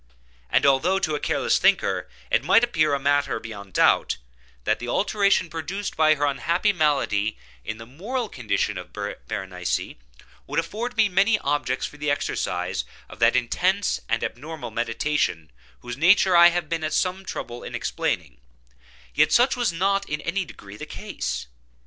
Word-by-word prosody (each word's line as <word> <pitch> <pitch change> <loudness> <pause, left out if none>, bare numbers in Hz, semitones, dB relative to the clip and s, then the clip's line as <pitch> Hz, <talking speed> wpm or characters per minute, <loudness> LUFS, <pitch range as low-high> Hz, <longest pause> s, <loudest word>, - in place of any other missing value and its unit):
And - - +3
although, 140 +8 +3
to 155 -5 -1
a 150 - -1
careless - - +1
thinker, - - +2 0.2
it - - +3
might 230 - +5
appear 155 -11 +2
a - - -2
matter 145 -2 +1
beyond 100 -4 -9
doubt, - - +3 0.5
that - - +1
the 120 - -6
alteration 200 - +2
produced 170 +5 -5
by 155 0 +4
her 145 0 0
unhappy 170 +8 +1
malady, 135 - +1 0.3
in 110 - -5
the 115 - -10
moral 215 - -4
condition 105 - -2
of - - -11
Berenice, 90 +8 -4 0.5
would - - -4
afford 225 +9 -4
me 220 -1 +5
many 200 +4 +3
objects 140 - -1
for 150 - -9
the 150 0 -2
exercise 145 - -1 0.3
of 90 - -12
that 115 +1 +4
intense 185 +11 +1
and - - 0
abnormal 145 -2 -6
meditation 115 - -1 0.3
whose 120 0 -6
nature 185 +3 +5
I 170 0 +9
have 175 -1 0
been 165 0 -2
at 155 - -2
some 185 +1 0
trouble 120 -9 -6
in - - -6
explaining, 65 -1 -2 0.7
yet - - +3
such 250 +3 +4
was 245 -5 +1
not 195 +4 0
in 150 - -2
any 185 +2 -1
degree 100 -9 -12
the - - -8
case. - - -4
155 Hz, 165 wpm, -24 LUFS, 120-190 Hz, 0.7 s, I